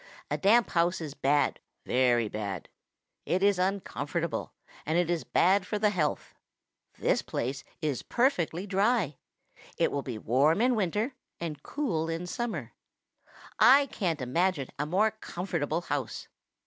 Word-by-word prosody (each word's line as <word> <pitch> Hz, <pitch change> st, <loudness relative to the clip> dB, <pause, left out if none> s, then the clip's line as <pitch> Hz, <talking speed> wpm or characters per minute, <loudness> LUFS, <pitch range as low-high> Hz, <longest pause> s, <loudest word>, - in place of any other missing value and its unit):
A -, -, +1 dB
damp 225 Hz, +5 st, +4 dB
house 175 Hz, +1 st, +2 dB
is 155 Hz, -4 st, -5 dB
bad, 145 Hz, +1 st, +1 dB, 0.3 s
very 120 Hz, -3 st, +3 dB
bad. 100 Hz, -4 st, -5 dB, 0.6 s
It 185 Hz, +2 st, +1 dB
is 200 Hz, -2 st, +4 dB
uncomfortable, 170 Hz, -4 st, -2 dB, 0.3 s
and 155 Hz, +3 st, 0 dB
it 175 Hz, -1 st, +2 dB
is 170 Hz, -2 st, -1 dB
bad 190 Hz, +3 st, +3 dB
for 210 Hz, -, -1 dB
the 210 Hz, 0 st, +2 dB
health. 160 Hz, -7 st, -1 dB, 0.6 s
This -, -, +1 dB
place 135 Hz, +3 st, -3 dB, 0.2 s
is 145 Hz, -5 st, -1 dB
perfectly 190 Hz, -, 0 dB
dry. 200 Hz, -, +1 dB, 0.6 s
It -, -, +2 dB
will 140 Hz, -, -1 dB
be 125 Hz, -4 st, -5 dB
warm 135 Hz, -, +3 dB
in 250 Hz, +2 st, +3 dB
winter 210 Hz, -, 0 dB, 0.3 s
and 155 Hz, -4 st, -5 dB
cool 170 Hz, -, -2 dB
in 165 Hz, +2 st, -3 dB
summer. 235 Hz, +5 st, -4 dB, 0.9 s
I 280 Hz, +2 st, +7 dB
can't 165 Hz, -, -1 dB
imagine 160 Hz, +2 st, 0 dB
a 150 Hz, -, -1 dB
more 205 Hz, +7 st, +3 dB
comfortable 175 Hz, -6 st, -3 dB
house. 145 Hz, -7 st, -4 dB
170 Hz, 140 wpm, -29 LUFS, 145-200 Hz, 0.9 s, I